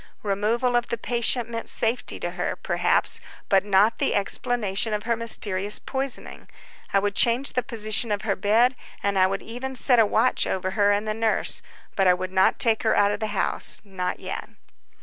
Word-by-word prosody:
Removal 220 +5 0
of 240 0 0
the 235 - -2
patient 235 +1 0
meant 230 -1 -5
safety 235 +2 0
to - - -3
her, - - -3
perhaps, - - 0 0.3
but 195 -2 +3
not 205 +2 +2
the - - 0
explanation 210 0 0
of 210 - -5
her 235 0 0
mysterious 210 -3 +2
poisoning. 270 -1 -4 0.4
I - - +2
would 200 +1 0
change 240 +6 +3
the 250 - 0
position 220 -2 0
of 205 0 -2
her 205 -3 -1
bed, 230 +6 +2 0.3
and 200 -1 0
I 185 - +4
would 195 +1 -4
even 255 +3 -7
set 250 -1 +3
a 225 - +5
watch - - +1
over 185 0 -2
her 205 0 +1
and 205 +1 -1
the 215 - -1
nurse, 225 0 0 0.3
but 195 -1 +2
I 180 - +5
would 185 +1 -6
not 190 0 +2
take 225 -2 +3
her 220 - +1
out 205 0 +3
of 205 - -4
the 220 - -3
house—not 195 -2 0
yet. - - -6
215 Hz, 190 wpm, -23 LUFS, 200-235 Hz, 0.4 s, a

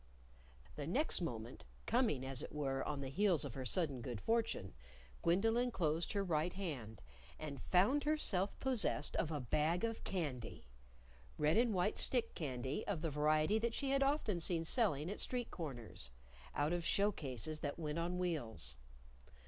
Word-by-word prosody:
The 145 -1 -3
next 265 - +3
moment, 120 -6 -4 0.2
coming, 220 - +2
as 135 -1 -1
it - - -6
were, 135 -3 -1
on 145 -2 -2
the 135 - -3
heels 180 -1 +2
of 135 - -5
her 130 -1 -5
sudden 145 -4 +1
good 120 -2 -4
fortune, 225 - 0 0.5
Gwendolyn 225 +8 +3
closed 165 -6 0
her 200 -1 +1
right 170 -1 0
hand 135 - -5 0.3
and 145 -4 -6
found 210 +11 +3
herself 220 -11 +1
possessed 250 - +1
of 160 - 0
a 150 - -1
bag 150 - +1
of 230 -1 -1
candy! 135 - -3 0.7
red 150 +1 +3
and 235 0 +4
white 185 +1 +1
stick 240 -3 +1
candy 135 - -3
of 185 -6 -1
the 165 -2 -1
variety 155 +7 +3
that 230 +1 0
she 275 -1 0
had 275 0 +3
often 275 - +2
seen 165 0 -1
selling 165 - +2
at 205 - -4
street 245 -2 -1
corners 120 - -6 0.5
(out 145 +3 +1
of 175 -1 -1
show 200 +4 +3
cases 150 - -3
that 145 -2 -3
went 155 -1 -2
on 175 +2 -1
wheels). 155 - -2
165 Hz, 165 wpm, -38 LUFS, 140-210 Hz, 0.7 s, and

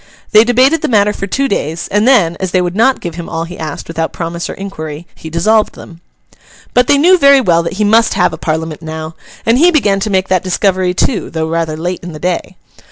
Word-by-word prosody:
They 215 0 +7
debated 255 +6 +3
the - - -1
matter 210 -2 +2
for 195 - -5
two 275 +7 0
days; 165 - -3
and 210 +3 +2
then, 195 -11 +4
as 190 - -2
they 185 - +1
would 175 +1 -3
not 255 +5 +2
give 170 - -5
him 170 0 -7
all 165 0 -3
he 175 +2 -9
asked 155 -1 -6
without 165 0 -3
promise 170 0 -5
or - - -6
inquiry, 160 -5 -7
he 160 - -10
dissolved 210 +7 +1
them. 170 -1 -13 0.7
But 250 0 +3
they 285 - +4
knew 355 +5 +4
very 280 -1 +6
well 175 -9 +2
that 170 - -4
he 210 +3 -1
must 225 +2 +3
have 180 -3 +2
a - - -5
Parliament 160 0 -3
now; 160 0 -6 0.3
and 230 +3 +3
he 345 +4 +6
began 210 - +2
to 215 - -2
make 190 -1 0
that 185 -2 +1
discovery 185 -1 0
too, 205 +3 -1
though 160 -1 -3
rather 165 -1 -2
late 175 +3 -3
in 175 -1 -8
the 150 - -9
day. 180 - -3
185 Hz, 235 wpm, -14 LUFS, 165-220 Hz, 0.7 s, They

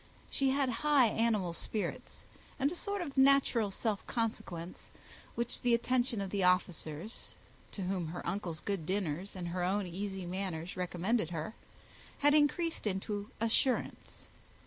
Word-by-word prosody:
She 270 -1 +2
had 275 0 +2
high 290 -6 +5
animal 215 -6 +1
spirits, 210 +4 -4 0.3
and 280 +2 +2
a - - -4
sort 400 +1 -2
of 285 -5 -7
natural 265 -5 +5
self 205 +1 -1
consequence, 185 -7 -3 0.5
which 235 0 -1
the 240 -1 +4
attentions 240 -2 +1
of 190 - -5
the 200 - 0
officers, 180 0 0 0.4
to 195 - -3
whom 180 -2 -1
her 170 +3 -6
uncle's 175 -6 -3
good 195 -6 -2
dinners 190 -1 -2
and 175 -2 -4
her 180 +1 -1
own 195 +2 +1
easy 190 +1 -4
manners 180 -2 -3
recommended 180 +2 0
her, 165 +4 -4 0.6
had 290 +1 +5
increased 305 -1 +2
into 205 +1 -2
assurance. 230 +4 0
205 Hz, 145 wpm, -33 LUFS, 180-245 Hz, 0.6 s, high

